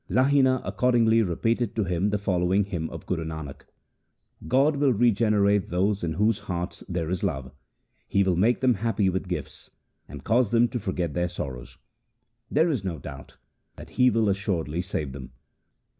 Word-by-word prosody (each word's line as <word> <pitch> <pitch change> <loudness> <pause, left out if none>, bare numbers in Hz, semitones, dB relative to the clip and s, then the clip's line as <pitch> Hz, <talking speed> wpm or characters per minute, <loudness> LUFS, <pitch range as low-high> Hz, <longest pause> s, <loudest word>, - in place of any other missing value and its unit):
Lahina 130 0 +3
accordingly 115 -2 +3
repeated 115 +4 -1
to 110 - +1
him 90 +2 0
the 105 - 0
following 95 0 +1
hymn 85 -5 -4
of - - -9
Guru 85 -3 -2
Nanak: 80 -4 -7 0.5
— - - -19
God 145 +2 +3
will 140 -1 +3
regenerate 105 -3 +2
those 95 +3 0
in 80 -2 -1
whose 105 +4 +1
hearts 90 -3 -5
there 85 -2 -2
is 95 - -2
love; 65 -1 -2 0.6
He 100 - +2
will 95 -2 +1
make 110 +8 +2
them 130 -1 +4
happy 105 -2 0
with 95 +1 -3
gifts, 90 - -6 0.4
and 70 -1 -10
cause 120 - +2
them 120 +1 +4
to 120 - -3
forget 90 -6 -3
their 90 0 -1
sorrows. 65 -8 -7 0.7
There 160 +4 +2
is 125 -9 -2
no 90 -4 -3
doubt 70 0 -10 0.4
that - - -12
He 125 0 +4
will 115 -2 +1
assuredly 95 -5 -1
save 80 -7 -4
them. 65 -1 -9
100 Hz, 175 wpm, -26 LUFS, 85-115 Hz, 0.7 s, them